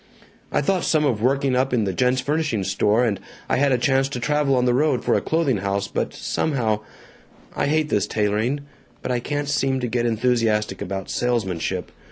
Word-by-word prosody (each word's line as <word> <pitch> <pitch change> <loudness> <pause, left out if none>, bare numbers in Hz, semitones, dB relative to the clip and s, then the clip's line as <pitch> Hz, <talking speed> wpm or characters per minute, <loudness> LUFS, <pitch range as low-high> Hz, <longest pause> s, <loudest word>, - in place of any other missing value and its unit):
) - - -31
I - - +1
thought 185 +5 +1
some 155 -2 +2
of 120 -7 0
working 135 +1 +2
up 130 0 +1
in 110 -3 +1
a 95 - -1
gents' 125 +5 +2
furnishings 140 -9 -1
store, 105 +5 +2
and 105 -4 -1 0.3
I - - +1
had 140 +1 +3
a 125 - +3
chance 135 +2 +2
to 125 - -4
travel 150 +1 +1
on 125 -1 +2
the 125 - +3
road 135 -2 +1
for - - +2
a - - +2
clothing 160 -7 +1
house, 100 +1 -1
but - - -2
somehow 115 -8 -1 0.8
I - - 0
hate 155 +1 +1
this 105 -5 +1
tailoring, 110 +7 0 0.4
but - - -2
I 125 - +1
can't 145 +3 -3
seem 135 -2 +1
to 125 - -1
get 120 0 0
enthusiastic 110 -3 +1
about 95 0 -4
salesmanship. 95 -7 -1
125 Hz, 205 wpm, -22 LUFS, 105-140 Hz, 0.8 s, had